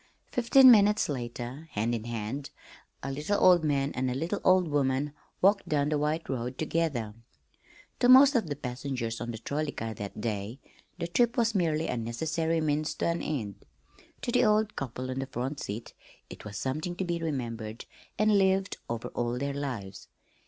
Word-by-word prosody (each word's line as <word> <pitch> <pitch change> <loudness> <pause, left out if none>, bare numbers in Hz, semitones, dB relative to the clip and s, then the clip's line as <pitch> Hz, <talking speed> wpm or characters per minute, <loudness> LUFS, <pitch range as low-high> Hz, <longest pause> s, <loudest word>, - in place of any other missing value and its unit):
Fifteen 250 +2 +7
minutes 210 -3 +5
later, 125 +3 -5
hand 110 +3 0
in 115 -1 -3
hand, 120 +4 -4 0.5
a 135 - -3
little 150 +9 -1
old 180 -3 +6
man 140 -2 +1
and 130 0 -1
a 125 - -2
little 170 +9 -2
old 185 -1 +4
woman 140 -1 0 0.3
walked 200 +1 +3
down 145 -1 +1
the 155 - +1
white 155 +2 -1
road 125 0 -3
together. 150 -9 -1 0.9
To 245 - +3
most 270 +2 +9
of 230 - +1
the 145 - -3
passengers 125 -3 -4
on 120 - -4
the 115 - -4
trolley 145 +6 -3
car 115 0 -4
that 100 0 -7
day 105 +1 -3 0.4
the 170 - -3
trip 240 +8 +2
was 230 -1 +2
merely 165 -5 +1
a 125 - -2
necessary 160 +8 -1
means 155 0 0
to - - 0
an 170 0 -1
end; 110 -10 -4 0.6
to 240 - -1
the 250 +1 +3
old 215 -1 +2
couple 130 -1 -4
on 130 - -3
the 135 - -3
front 135 +3 -4
seat 105 +4 -6 0.4
it - - -10
was 105 -1 -6
something 155 - -3
to 190 - -2
be 170 -1 -2
remembered 115 -7 -4 0.3
and 215 -1 +4
lived 190 0 +1
over 115 -1 -3
all 120 0 -2
their 140 +2 -2
lives. 125 -9 -5
145 Hz, 180 wpm, -29 LUFS, 120-175 Hz, 0.9 s, most